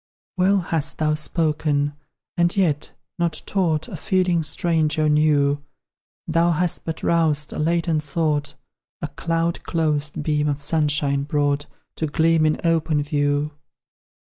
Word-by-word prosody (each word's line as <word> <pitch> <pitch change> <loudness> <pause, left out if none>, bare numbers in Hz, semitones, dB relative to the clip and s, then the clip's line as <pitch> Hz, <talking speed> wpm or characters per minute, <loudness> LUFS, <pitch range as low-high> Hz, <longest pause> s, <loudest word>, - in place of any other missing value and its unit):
Well 190 +2 +3
hast 160 -3 -2
thou 155 -1 +1
spoken, 150 -2 0 0.4
and 175 +2 +1
yet 155 -7 +1 0.3
not 170 -3 -1
taught 165 -6 0
A - - -7
feeling 185 -3 +1
strange 155 0 +1
or 155 -1 +2
new; 145 -2 +2 0.6
Thou 165 +1 +2
hast 175 +1 -1
but 160 -1 -5
roused 155 -3 +2
a - - -5
latent 165 0 +1
thought, 150 -1 -1 0.5
A - - 0
cloud 165 +2 -1
closed 150 -2 -1
beam 150 -1 +1
of 145 -1 -1
sunshine 145 -2 +1
brought 145 0 0 0.3
To 160 - -1
gleam 160 +1 +3
in 155 - 0
open 160 -3 +1
view. 145 0 0
155 Hz, 135 wpm, -22 LUFS, 145-165 Hz, 0.6 s, Well